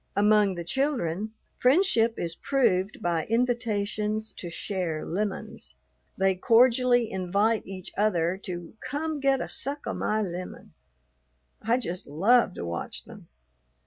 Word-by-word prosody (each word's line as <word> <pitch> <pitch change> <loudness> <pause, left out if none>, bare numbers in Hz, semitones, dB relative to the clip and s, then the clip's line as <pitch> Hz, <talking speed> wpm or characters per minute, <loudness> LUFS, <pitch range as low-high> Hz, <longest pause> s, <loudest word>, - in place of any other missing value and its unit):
Among 205 -1 +4
the 170 - -5
children 215 - -1 0.3
friendship 250 - +3
is 170 -1 -1
proved 210 -4 0
by 170 -2 0
invitations 215 -2 -1
to 175 - -7
share 170 -3 -3
lemons. 190 - -4 0.4
They 190 0 +3
cordially 245 +3 +4
invite 200 +4 0
each 185 -2 -6
other 180 -4 +1
to 175 -3 -6
"come 305 +2 -3
get 275 -1 +2
a - - -3
suck 285 +1 -1
o' - - -2
my 215 0 0
lemon." 180 -1 -7 0.9
I 230 +3 +2
just 185 -7 -4
love 195 +8 +3
to - - -5
watch 85 0 -4
them. - - -13
210 Hz, 130 wpm, -27 LUFS, 180-240 Hz, 0.9 s, Among